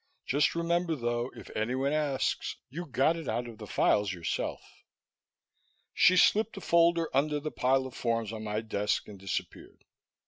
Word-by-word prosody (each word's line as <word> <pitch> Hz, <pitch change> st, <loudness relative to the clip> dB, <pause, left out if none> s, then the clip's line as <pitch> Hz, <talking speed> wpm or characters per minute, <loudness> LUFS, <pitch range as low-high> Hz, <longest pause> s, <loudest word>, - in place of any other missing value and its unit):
Just 145 Hz, +4 st, +2 dB
remember 170 Hz, 0 st, 0 dB
though, 120 Hz, -1 st, -2 dB
if -, -, -11 dB
anyone 130 Hz, +6 st, 0 dB
asks, 145 Hz, -3 st, -1 dB, 0.2 s
you 175 Hz, +5 st, -6 dB
got 140 Hz, +4 st, +2 dB
it 165 Hz, -4 st, -7 dB
out 120 Hz, +2 st, -2 dB
of 115 Hz, -2 st, -11 dB
the 105 Hz, -, -8 dB
files 100 Hz, 0 st, +2 dB
yourself." 85 Hz, -3 st, -4 dB, 1.1 s
She 185 Hz, -, +5 dB
slipped 215 Hz, +4 st, +4 dB
a -, -, -6 dB
folder 170 Hz, -1 st, +3 dB
under 150 Hz, +2 st, +2 dB
the 155 Hz, +1 st, -5 dB
piles 130 Hz, +1 st, +2 dB
of 130 Hz, -, -8 dB
forms 115 Hz, -2 st, -1 dB
on 110 Hz, -1 st, -6 dB
my 105 Hz, 0 st, -2 dB
desk 105 Hz, -2 st, -1 dB
and 100 Hz, -2 st, -11 dB
disappeared. 95 Hz, 0 st, -6 dB
130 Hz, 165 wpm, -30 LUFS, 110-160 Hz, 1.1 s, She